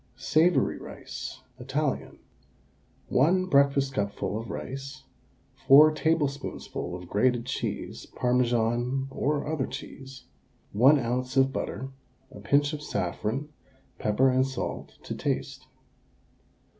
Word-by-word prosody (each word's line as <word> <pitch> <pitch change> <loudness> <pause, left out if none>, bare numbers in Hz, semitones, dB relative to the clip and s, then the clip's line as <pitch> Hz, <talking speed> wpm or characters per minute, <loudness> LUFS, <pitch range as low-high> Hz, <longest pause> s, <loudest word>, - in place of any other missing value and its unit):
SAVOURY 170 +3 +2
RICE 130 - -8 0.2
(Italian). 135 +3 -2 0.9
1 180 +8 +3
breakfastcupful 135 -7 +1
of 115 - -10
rice, 135 +1 -6 0.6
4 150 +3 +9
tablespoonfuls 145 - -2
of - - -12
grated 120 +4 +1
cheese - - -4
(Parmesan 125 +1 0
or 145 +2 -1
other 150 -3 -1
cheese), 135 -1 -9 0.5
1 130 +8 +6
oz. 125 +1 -2
of 135 0 +4
butter, 135 +2 -4 0.4
a - - -11
pinch 145 +1 +2
of 150 - -5
saffron, 115 - -3 0.5
pepper 125 +5 +3
and 130 +1 +2
salt 135 -1 -5
to - - -5
taste. - - -3
135 Hz, 105 wpm, -27 LUFS, 125-145 Hz, 0.9 s, 4